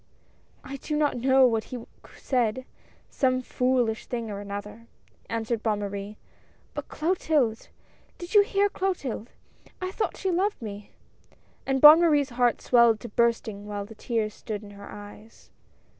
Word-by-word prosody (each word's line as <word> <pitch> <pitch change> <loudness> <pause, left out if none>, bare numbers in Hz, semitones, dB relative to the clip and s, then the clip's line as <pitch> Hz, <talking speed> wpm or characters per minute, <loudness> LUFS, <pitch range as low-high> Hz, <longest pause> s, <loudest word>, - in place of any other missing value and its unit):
" - - -35
I - - -4
do 300 +3 -4
not 295 -3 +1
know 265 +1 +5
what 225 -3 +1
he 245 -3 -7 0.3
said 250 -1 -1 0.5
some 255 -1 +1
foolish 250 -3 0
thing 230 -3 -4
or 200 - -5
another," 205 +3 -7 0.4
answered 230 0 -2
Bonne 215 -2 0
Marie, 200 +1 -5 0.3
" - - -35
But - - -6
Clotilde! 305 -9 0 0.5
Did 350 +2 -8
you 415 - +8
hear 405 -1 +2
Clotilde? 350 - -3 0.5
I 370 0 -3
thought 430 - -2
she 380 - -1
loved 385 +4 0
me!" 205 -2 -8 0.8
and 270 0 +1
Bonne 305 +3 +10
Marie's 295 -5 +3
heart 240 -1 +1
swelled 235 -3 +5
to 240 - -7
bursting 220 -2 0
while 205 -1 -4
the 225 - -12
tears 220 -1 -2
stood 215 -1 -6
in 205 - -11
her 200 0 -11
eyes. 205 +2 -13
235 Hz, 160 wpm, -26 LUFS, 215-285 Hz, 0.8 s, Bonne